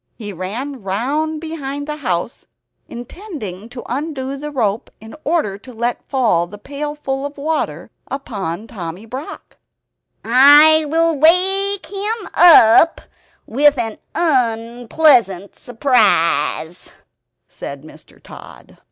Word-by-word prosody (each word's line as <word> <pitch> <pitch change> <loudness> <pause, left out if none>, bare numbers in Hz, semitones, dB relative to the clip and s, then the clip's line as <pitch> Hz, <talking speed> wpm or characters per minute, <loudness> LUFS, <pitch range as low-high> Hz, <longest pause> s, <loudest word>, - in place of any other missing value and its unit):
He 205 -3 -8
ran 235 +9 -6
round 280 +11 -2
behind 285 -3 -6
the 300 0 -4
house, 190 - -4 0.4
intending 240 - -9
to 245 0 -9
undo 275 0 -4
the 295 +2 -6
rope 230 -5 -2
in 220 +1 -12
order 290 - -1
to 255 - -13
let 235 +1 -3
fall 225 -11 +1
the 205 +4 -11
pailful 280 +2 -5
of 285 +1 -6
water 310 +3 -3 0.2
upon 205 -8 -5
Tommy 180 -2 -8
Brock 260 +7 -9 0.7
"I 290 +6 +6
will 330 +2 +1
wake 380 +6 +3
him 415 +2 -4
up 330 -2 +6 0.4
with 285 +4 +3
an 225 -3 -4 0.2
unpleasant 235 - +1
surprise," 180 - 0 0.5
said 140 0 -9
Mr. 155 - -17
Tod. - - -14
265 Hz, 110 wpm, -18 LUFS, 215-305 Hz, 0.7 s, I